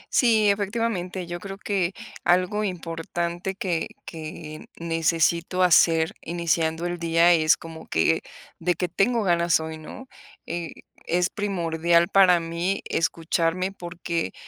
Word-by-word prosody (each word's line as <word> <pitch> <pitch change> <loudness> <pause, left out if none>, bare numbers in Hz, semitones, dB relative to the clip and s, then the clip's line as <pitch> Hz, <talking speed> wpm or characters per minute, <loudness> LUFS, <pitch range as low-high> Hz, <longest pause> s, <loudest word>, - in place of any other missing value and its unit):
Sí, 225 -4 +4
efectivamente, 200 -3 -2
yo 175 0 -6
creo 195 +1 -7
que 195 -3 -1 0.3
algo 185 +4 +2
importante 175 0 -3
que 175 -4 -1 0.2
que 155 -1 -8
necesito 165 +2 +1
hacer 165 -2 +4
iniciando 165 -1 -1
el 175 0 -3
día 170 +1 +4
es 155 -2 +4
como 160 -1 -10
que: 80 - +2 0.4
"¿De 175 +1 +1
qué 180 - -1
tengo 225 +6 +1
ganas 170 -3 +3
hoy?",¿no? 160 +10 -8 0.4
Es 175 +1 -3
primordial 170 -3 +1
para 185 -3 +6
mí 170 +4 -2
escucharme, 165 +3 0
porque, 175 -2 -4
175 Hz, 115 wpm, -25 LUFS, 165-185 Hz, 0.4 s, para